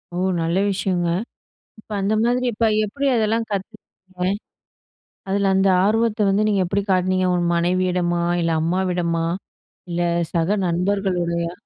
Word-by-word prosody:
ஓ! - - -3 0.2
நல்ல 165 +2 0
விஷயங்க, 185 -3 0 0.7
இப்போ 215 - -13
அந்த 200 +3 +1
மாதிரி 245 +1 +1
இப்ப 230 +1 +1 0.2
எப்படி 275 +7 -3
அதெல்லாம் 225 +1 +1
கத்துக்கறீங்க? 190 -2 -5 1.0
அதில 195 0 +1
அந்த 190 +1 +3 0.2
ஆர்வத்தை 220 +1 +2
வந்து 205 +2 +2
நீங்க 200 -2 +2
எப்படி 195 +3 0
காட்டுனீங்க, 185 0 +2
உங்க 175 -1 +1
மனைவியிடமா? 175 0 +1 0.2
இல்ல 165 0 0
அம்மாவிடமா, 175 -1 0 0.6
இல்ல 175 0 -2 0.3
சக 170 +1 +1 0.2
நண்பர்களோடயா? 175 -2 -1
185 Hz, 125 wpm, -21 LUFS, 175-205 Hz, 1.0 s, அந்த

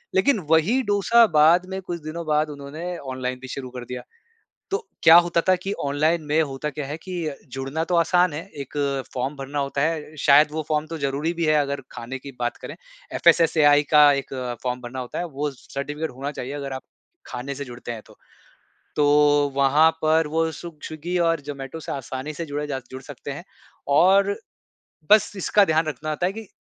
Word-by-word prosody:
लेकिन 220 +4 +3
वही 195 +12 +4
डोसा 205 +2 +4
बाद 170 +4 +6
में 190 0 -4
कुछ 175 -2 -5
दिनों 165 +2 -5
बाद 150 0 +2
उन्होंने 150 +5 -6
ऑनलाइन 130 -3 -4
भी 130 - -8
शुरू 130 0 -6
कर 125 -1 -8
दिया। 125 0 -6 0.7
तो 395 - +2 0.3
क्या 165 +1 +9
होता 170 -1 +1
था 185 - +6
कि 195 - -2
ऑनलाइन 155 +4 +1
में 150 +2 +2
होता 140 0 -3
क्या 150 -1 -5
है 150 - -5
कि 185 +3 -11 0.2
अ, 150 - -3 0.2
जुड़ना 135 +4 -3
तो 175 +1 -1
आसान 175 0 +3
है, 150 - -4 0.2
1 140 +2 -8 0.4
फ़ॉर्म 130 +3 -2
भरना 140 +1 -4
होता 140 0 -1
है, 155 0 -2
शायद 145 +1 +6
वो 155 - -2
फ़ॉर्म 150 0 0
तो 165 - -5
ज़रूरी 140 +3 -1
भी 165 - +2
है 155 - +3
अगर 140 0 -3
खाने 130 +3 -7
की 140 +1 -9
बात 120 0 -2
करें, - - -8 0.4
एफएसएसएआई 155 -3 +5
का 150 -1 +8
1 135 - -13 0.3
फ़ॉर्म 125 0 -2
भरना 125 +2 -6
होता 125 -1 -5
है, 175 - -2
वो 150 -2 -3
स 130 - -19
सर्टिफ़िकेट 145 +3 -3
होना 135 +3 -5
चाहिए, 135 0 -6
अगर 140 -2 -5
आप 130 - -5 0.5
खाने 135 +3 -5
से 140 0 -5
जुड़ते 120 -1 -8
हैं 115 -2 -6
तो। - - -17 0.8
तो 145 -1 +4
वहाँ 140 +3 +5
पर 155 0 +3
वो 160 +1 0
सुग 165 -2 -10
स्विग्गी 165 +3 -4
और 165 -1 +2
ज़ोमैटो 140 +1 -7
से - - -7
आसानी 135 +2 -5
से 165 +2 -5
जुड़े 145 0 -4
जा 135 -2 -3
जुड़ 130 0 -7
सकते - - -8
हैं, - - -7 0.4
और 195 +7 +4 0.8
बस 215 0 +5
इसका 200 +2 +3
ध्यान 160 -2 +1
रखना 155 +1 -4
होता 155 +4 0
है 190 - -1
कि 220 +1 -8
150 Hz, 205 wpm, -23 LUFS, 140-165 Hz, 0.8 s, क्या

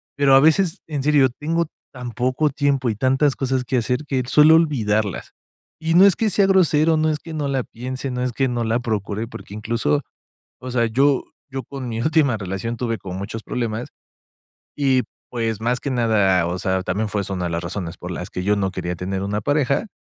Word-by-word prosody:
pero 140 -1 +5
a - - +8
veces, 160 +4 +3
en 145 -4 -3
serio, 145 -3 +5
tengo 165 +6 -1 0.3
tan 125 -2 -7
poco 130 +6 0
tiempo 140 -3 +1
y 110 - -1
tantas 135 +4 +2
cosas 130 -1 -1
que 130 - -2
hacer, 125 +5 -1
que 130 -2 0
suelo 155 +3 +6
olvidarlas. 110 - 0 0.5
Y 165 +1 0
no 190 +3 +8
es 195 - +5
que 220 -2 +1
sea 195 0 +3
grosero, 165 -4 +4
no 155 0 +2
es 150 -1 -1
que 165 - -9
no 150 -2 -2
la 135 -2 0
piense, 130 +3 -6
no 125 0 -2
es 125 - -1
que 135 +2 0
no 120 -1 -1
la 115 +2 +1
procure, 110 -1 -3
porque 100 - -10
incluso, 115 +7 0 0.6
o 130 0 -6
sea, 120 -2 +2
yo 135 +4 +2 0.3
yo 135 0 -4
con 135 -3 -7
mi 115 0 -3
última 150 -3 +2
relación 100 +4 -4
tuve 115 -3 -2
como 95 0 -7
muchos 110 +3 -5
problemas, 115 -1 -3 0.9
y, 135 -3 +3 0.3
pues, 115 -3 -2
más 120 +2 0
que 140 - -3
nada, 105 -8 +2
o 90 +1 -2
sea, 95 0 0
también 100 +4 -1
fue 100 0 -1
esa 95 - -5
una 90 -2 -2
de 85 - -2
las 85 +1 -2
razones 85 -1 -5
por 90 - -8
las 90 +2 -5
que 90 - -4
yo 105 +1 +2
no 95 -1 0
quería 90 -1 -3
tener 95 +2 -3
una 105 +1 -2
pareja, 145 - +1
125 Hz, 215 wpm, -21 LUFS, 105-145 Hz, 0.9 s, a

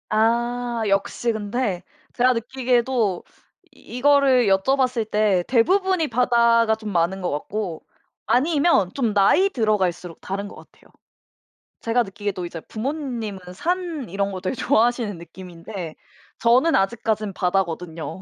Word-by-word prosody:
아 235 +2 0
역시 195 +4 0
근데 205 -3 -2 0.3
제가 255 +1 +3
느끼기에도 240 -4 0 0.5
이거를 265 -2 +2
여쭤봤을 240 +3 +1
때 210 -4 +2
대부분이 365 +7 +2
바다가 235 -2 +3
좀 215 -1 -7
많은 180 +2 0
것 180 - -1
같고 170 +3 -4 0.4
아니면 285 - +2
좀 235 -6 0
나이 205 - +4
들어갈수록 190 - -1
다른 200 +2 -4
것 - - -12
같아요. - - -18 0.9
제가 235 +1 +1
느끼기에도 200 -3 -5
이제 170 -1 -7
부모님은 235 - -4
산 335 - -3
이런 200 +2 -2
거 185 -1 -6
되게 185 +8 -2
좋아하시는 235 -5 +1
느낌인데 175 0 -9 0.4
저는 255 +8 +4
아직까지는 215 0 0
바다거든요. 180 -2 -2
220 Hz, 295 characters per minute, -22 LUFS, 195-250 Hz, 0.9 s, 나이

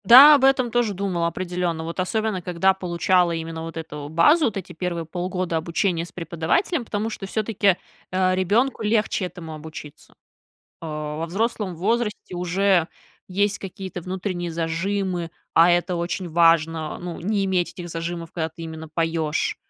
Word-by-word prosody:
Да, 270 +6 +11
об 275 - +1
этом 260 -3 +3
тоже 235 -3 +1
думала 180 -3 0
определённо. 175 -1 -2
Вот 165 +3 -5
особенно 215 +1 0
когда 180 +2 +2
получала 180 -1 +2
именно 165 0 -4
вот 165 0 -7
эту 150 -3 -6
базу, 295 - +5
вот 215 - -1
эти 190 - -7
1 170 -1 -3
полгода 180 0 -2
обучения 170 +1 0
с - - -13
преподавателем, 180 - -1
потому 215 +1 -2
что 195 - -6
всё-таки, 205 -3 +1 0.3
а, 185 0 +2
ребёнку 215 +9 +1
легче 210 -2 +1
этому 165 -3 -8
обучиться. 155 -1 -10 0.7
А 150 -2 -4
во 165 +1 -3
взрослом 210 +1 -1
возрасте 210 0 -1
уже 180 0 +2 0.4
есть 200 +2 0
какие-то 190 -1 -7
внутренние 185 -1 -3
зажимы, 170 +2 -2 0.2
а 165 +2 +7
это 175 +1 +1
очень 175 +1 -3
важно, 165 -1 +3
ну, 175 -1 -6
не 200 +2 0
иметь 185 -2 0
этих 175 -1 -8
зажимов, 165 0 -4
когда 160 -2 -2
ты 165 +2 -11
именно 160 -1 -7
поёшь. 165 -1 -1
180 Hz, 155 wpm, -23 LUFS, 165-200 Hz, 0.7 s, Да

